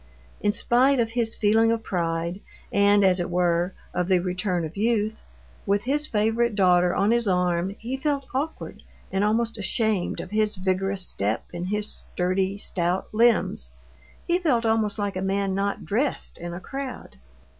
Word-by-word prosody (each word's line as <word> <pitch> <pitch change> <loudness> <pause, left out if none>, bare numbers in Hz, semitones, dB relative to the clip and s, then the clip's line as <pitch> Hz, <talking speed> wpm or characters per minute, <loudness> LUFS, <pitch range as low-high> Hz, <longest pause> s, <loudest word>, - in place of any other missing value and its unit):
In 205 - +2
spite 250 +5 +3
of 225 -1 +1
his 230 -1 0
feeling 225 +2 +3
of 230 -1 -1
pride 170 0 -2 0.3
and, 200 0 +5
as 185 -1 +3
it 175 - -2
were, 175 0 +1 0.2
of 180 - -1
the 185 -1 +4
return 180 -1 -1
of 155 - -8
youth, 220 0 0 0.5
with 200 +1 +2
his 295 +4 0
favorite 225 0 +1
daughter 180 -2 +4
on 200 +3 +2
his 235 -1 +2
arm, 180 0 +1
he 250 +4 -4
felt 280 -1 -1
awkward, 290 +5 -4 0.3
and 195 +1 +1
almost 225 +2 +1
ashamed 210 -2 0
of 185 - -7
his 215 0 +1
vigorous 190 0 -1
step 105 - -2
and 175 +1 -4
his 210 +1 0
sturdy, 185 +2 -1
stout 180 -2 -2
limbs. 225 - +2 0.6
He 345 +1 +1
felt 255 -10 +1
almost 220 -2 +1
like 205 -2 -2
a 185 - -2
man 195 0 0
not 200 +1 -2
dressed 250 +8 -1
in 175 0 -5
a 175 - -6
crowd. 270 - -7
200 Hz, 165 wpm, -25 LUFS, 180-225 Hz, 0.6 s, and